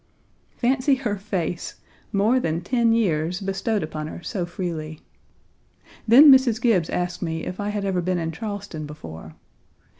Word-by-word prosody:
Fancy 265 +3 +2
her 240 -6 -2
face, 185 -4 -3 0.4
more 215 +6 +3
than 165 -7 -1
ten 235 +4 +2
years 180 -6 +1
bestowed 195 +1 -1
upon 155 -1 -5
her 170 - -9
so 180 -6 -3
freely. 160 -4 -5 1.1
Then 275 +6 +9
Mrs. 260 -4 +5
Gibbes 210 -10 +2
asked 180 0 -2
me 160 -2 -3
if 185 - -6
I 205 0 -2
had 205 -1 -2
ever 185 -2 0
been 180 +1 -1
in 165 -1 -2
Charleston 195 -4 -6
before. 80 - -10
190 Hz, 150 wpm, -23 LUFS, 165-225 Hz, 1.1 s, Then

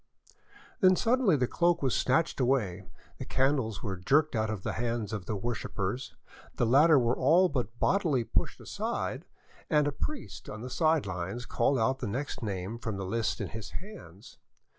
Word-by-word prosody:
Then 185 -1 +6
suddenly 230 -4 +3
the 130 -3 +2
cloak 175 +4 +1
was 130 - +2
snatched 155 +5 +1
away, 105 -8 0 0.3
the - - -5
candles 130 -6 0
were 95 -4 -3
jerked 145 - +2
out 110 -1 0
of 105 -3 -4
the - - -1
hands 115 -2 -2
of 100 -4 -5
the 110 - -1
worshippers, 115 +2 -3 0.4
the - - +1
latter 145 +6 +6
were 120 -1 +2
all 180 +3 +4
but 120 -5 -3
bodily 160 - +2
pushed - - -1
aside, - - -3 0.4
and 150 -1 +3
a - - +1
priest 280 - -6
on 105 - -7
the 125 +1 -6
side 160 -3 +2
lines 95 +5 -4
called 130 +5 +1
out 130 +3 +1
the - - -3
next 130 +8 -4
name 100 +1 -4
from 110 -3 -4
the 100 - -4
list 115 +3 -1
in - - -3
his 110 -1 -7
hands. 170 - -12
120 Hz, 180 wpm, -29 LUFS, 105-150 Hz, 0.4 s, Then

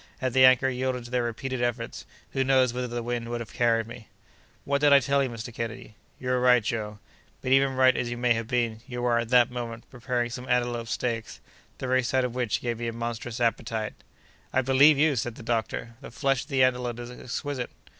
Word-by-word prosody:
Had 130 -2 -2
the 130 0 +7
anchor 130 0 +6
yielded 130 -1 -2
to 120 - -10
their 125 -1 +1
repeated 120 +2 -3
efforts, 120 -1 -3 0.2
who 135 - +1
knows 130 -2 +3
whither 125 0 -2
the 120 0 -4
wind 120 0 -3
would 120 0 -3
have 115 - -8
carried 115 -1 +2
me?" 115 0 -11 0.6
"What 140 0 0
did 145 -1 +5
I 140 - +8
tell 140 +2 +1
you, 135 - 0
Mr. 115 0 -7
Kennedy?" 115 0 -6 0.3
"You 125 - -4
were 125 0 +2
right, 125 -2 +5
Joe; 105 -1 -3 0.5
but, 130 - -2
even 135 0 +4
right 130 0 +5
as 120 - -1
you 120 - -4
may 120 0 +3
have 115 -1 -3
been, 120 -3 0
you 125 -2 -5
were, 120 -1 +3
at 115 -1 -3
that 125 -1 +5
moment, 115 -2 -6
preparing 125 -1 -2
some 125 +1 -7
antelope 120 -1 0
steaks, 115 -1 -3 0.4
the - - -5
very 130 0 +2
sight 130 +1 +1
of 125 - -4
which 120 -4 -1
gave 120 -2 -3
me 120 - -3
a 115 - -3
monstrous 115 0 -4
appetite." 115 -2 -1 0.6
"I 130 - +2
believe 135 +3 +6
you!" 150 0 +3
said 120 -1 -2
the - - -11
doctor; 115 0 -2
"the - - -9
flesh 135 +2 0
of - - -27
the 135 -4 +2
antelope 125 -2 +1
is 120 0 -7
exquisite." 130 +1 -4
120 Hz, 225 wpm, -27 LUFS, 115-130 Hz, 0.6 s, I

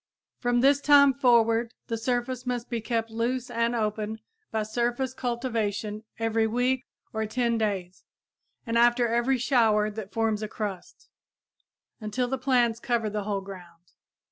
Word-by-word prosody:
From 245 -1 +1
this 280 +1 +4
time 285 -2 +6
forward 235 -3 +3
the 230 - -3
surface 245 +2 -2
must 245 0 -3
be 235 -1 -1
kept 225 0 -2
loose 240 +2 -2
and 230 0 0
open 215 -1 -2 0.3
by 220 -1 -1
surface 240 +4 -1
cultivation 225 -4 -2
every 225 -1 +1
week 250 +3 0 0.3
or 220 0 -1
10 235 +1 0
days 190 -4 -3 0.6
and 230 -1 +1
after 240 0 +4
every 240 +3 +1
shower 225 -4 +2
that 205 -2 -7
forms 220 0 0
a 215 - -3
crust, 205 -4 -6 0.9
until 230 +3 -2
the 265 +1 -2
plants 245 -3 +2
cover 235 -3 -1
the 210 -1 -3
whole 200 -2 -1
ground. 175 -3 -12
230 Hz, 145 wpm, -27 LUFS, 215-245 Hz, 0.9 s, time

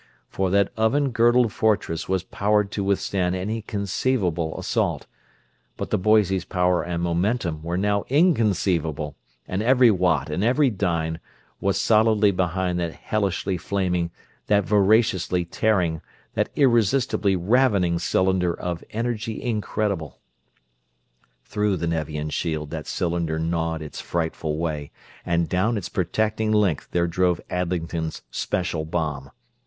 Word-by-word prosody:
For 95 -1 -1
that 100 +1 +2
oven 130 +5 +2
girdled 120 -1 +3
fortress 100 -7 0
was 95 -2 0
powered 105 +1 0
to 100 - -2
withstand 95 -2 0
any 105 +5 -3
conceivable 100 -5 -1
assault; - - -1 0.7
but - - -5
the - - +3
Boise's 95 -2 +3
power 90 -1 +1
and 85 0 -3
momentum 85 -1 0
were 85 +2 -3
now 100 +1 0
inconceivable, 95 - +1 0.3
and 95 +2 -2
every 125 0 +5
watt 85 -7 +1
and 90 +6 -1
every 130 +3 +3
dyne 85 -5 -1 0.4
was 100 0 0
solidly 110 -2 +4
behind 90 -1 -1
that 85 -2 -2
hellishly 100 -2 -1
flaming, 90 -2 -1 0.4
that 105 -1 +3
voraciously 100 -4 +2
tearing, 90 -3 0 0.3
that - - 0
irresistibly 115 -5 +2
ravening 95 -3 +2
cylinder 95 -2 +1
of 90 -1 -4
energy 115 -1 -3
incredible! 105 - -2 1.3
Through 105 -2 0
the 85 - -2
Nevian 75 -2 -2
shield 80 -3 -2
that 80 -3 -5
cylinder 85 -2 -1
gnawed 80 -1 -1
its 75 - -7
frightful 80 -2 -2
way, 75 -3 -3 0.3
and 85 -1 0
down 105 +6 +1
its 100 - -5
protecting 110 +3 0
length 105 -8 +1
there 85 -1 +1
drove 90 0 +1
Adlington's 85 -2 -2
"Special" 85 -3 -2
bomb. 75 -4 -3
95 Hz, 125 wpm, -24 LUFS, 85-105 Hz, 1.3 s, every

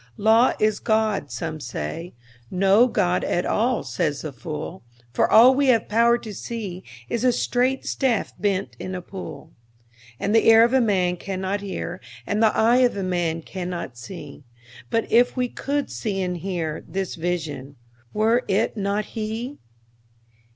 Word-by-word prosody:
Law 225 +4 +4
is 215 0 +2
God, 215 -8 0
say 155 +7 -4
some: 120 - -8
no 195 +6 +5
God 185 -7 +1
at 175 - 0
all, 245 +3 +1
says 150 -5 -2
the 155 -3 -5
fool; 155 +7 -6 0.3
For - - +2
all 245 +4 +8
we 280 +1 +2
have 230 -4 +3
power 235 +2 +4
to 220 -3 -8
see 195 -3 -6 0.2
is 235 - -2
a 255 - +5
straight 255 +2 0
staff 250 -6 0
bent 200 -1 -1
in 185 - -5
a 180 - -4
pool; 165 -7 -9 0.7
And 205 - -1
the 225 - +4
ear 225 0 +8
of 235 - +3
man 195 -9 +2
cannot 190 +2 -3
hear, 185 -2 -5 0.2
and 210 +2 -1
the 220 -1 +3
eye 230 +3 +4
of 250 -3 +3
man 175 -4 -1
cannot 175 -8 -5
see; 145 +2 -10 0.5
But 225 - +1
if 245 +3 +4
we 250 0 +1
could 285 +3 -3
see 205 -4 -3
and 180 -1 -2
hear, 170 -4 -3
this 195 -1 -3
Vision—were 155 - -2
it 210 +5 +1
not 200 0 -1
He? 225 +6 -5
195 Hz, 155 wpm, -23 LUFS, 170-230 Hz, 0.7 s, all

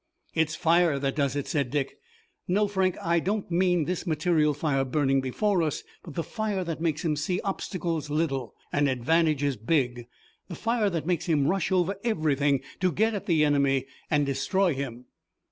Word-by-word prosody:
"It's 160 -1 +1
fire 170 -2 +3
that 135 0 -1
does 140 -2 0
it," 145 - -2
said 140 -5 -1
Dick. 140 0 -2 0.5
"No, 205 +3 +2
Frank, 190 -2 0
I 170 0 +2
don't 195 +2 -2
mean 175 -2 +2
this 180 +2 -3
material 155 -2 +2
fire 145 -2 0
burning 135 0 +1
before 180 +9 +1
us, 155 -2 -1 0.2
but 165 -6 -11
the 165 - -1
fire 210 +1 -2
that 165 -2 -4
makes 165 -1 -1
him 155 -2 +1
see 170 +5 -1
obstacles 170 -5 -3
little, 145 -4 -1 0.2
and 145 -1 +3
advantages 145 +1 +1
big, 120 -1 0 0.4
the 175 - -7
fire 225 0 +1
that 165 -4 -3
makes 175 0 -1
him 150 -5 +2
rush 195 +5 0
over 185 +1 +1
everything 145 - +1 0.2
to 185 -1 +2
get 220 +5 +1
at 205 - -5
the 160 -3 +4
enemy 140 -2 +2 0.2
and 145 -1 +2
destroy 155 +7 +1
him." 125 -3 -5
160 Hz, 180 wpm, -27 LUFS, 140-180 Hz, 0.5 s, the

